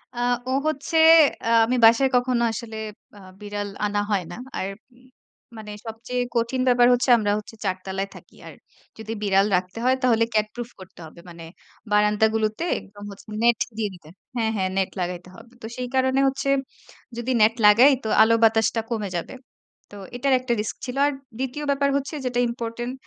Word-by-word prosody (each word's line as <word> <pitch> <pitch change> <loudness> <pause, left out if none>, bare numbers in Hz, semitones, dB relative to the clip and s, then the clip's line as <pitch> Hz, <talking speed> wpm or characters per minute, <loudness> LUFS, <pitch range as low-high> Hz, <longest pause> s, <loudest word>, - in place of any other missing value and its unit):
আ - - -5 0.3
ও - - -1 0.2
হচ্ছে 310 +2 -2 0.7
আমি 250 - 0
বাসায় 235 +4 +5
কখনো 245 -1 +1
আসলে 225 0 -7 0.4
আ - - -13 0.2
বিড়াল 205 0 -5 0.2
আনা 205 0 -1
হয় 195 -3 +1
না। - - -7 0.2
আর 190 - -2 0.9
মানে 210 -1 -9 0.2
সবচেয়ে 235 +3 -4
কঠিন 235 +3 0
ব্যাপার 245 -1 +5
হচ্ছে 245 +1 0
আমরা 205 -2 0
হচ্ছি 215 +1 -12
৪ 185 - 0
তলায় 195 +1 -3
থাকি। - - -16
আর - - -10 0.4
যদি 220 0 -8
বিড়াল 195 -1 +3
রাখতে 185 +4 -3
হয় 260 +1 +4
তাহলে 230 -2 +3
ক্যাট 215 -1 +2
প্রুফ 240 -1 -6
করতে 185 -1 -14
হবে। 160 +2 -14
মানে 170 -1 -11 0.5
বারান্দাগুলোতে 215 +4 +1 0.2
একদম 205 +1 -14
হচ্ছে 200 - -14 0.2
নেট 235 -2 +4 0.2
দিয়ে 215 -2 -1
দিতে 165 -4 -15 0.3
হ্যাঁ, 225 -2 0
হ্যাঁ। 185 -1 0
নেট 190 -1 +1
লাগাইতে 180 0 -4
হবে। 235 - -15
তো - - -8
সেই 250 0 -3
কারণে 260 +1 +2
হচ্ছে 275 +1 -2 0.7
যদি 240 +2 -3
নেট 220 +1 +5
লাগাই 235 +7 +7
তো - - -4
আলো 220 +1 +5
বাতাসটা 225 0 +3
কমে 215 -4 -3
যাবে। 170 - -4 0.6
তো 205 - -13 0.2
এটার 270 +2 +1
একটা 250 -1 -2
রিস্ক 210 - -5
ছিল। 250 +2 -6
আর - - 0 0.3
২য় 265 +3 -4
ব্যাপার 280 0 +1
হচ্ছে 280 +3 -5
যেটা 245 -1 -1
ইম্পর্টেন্ট 235 +1 -5
225 Hz, 175 wpm, -23 LUFS, 205-250 Hz, 0.9 s, লাগাই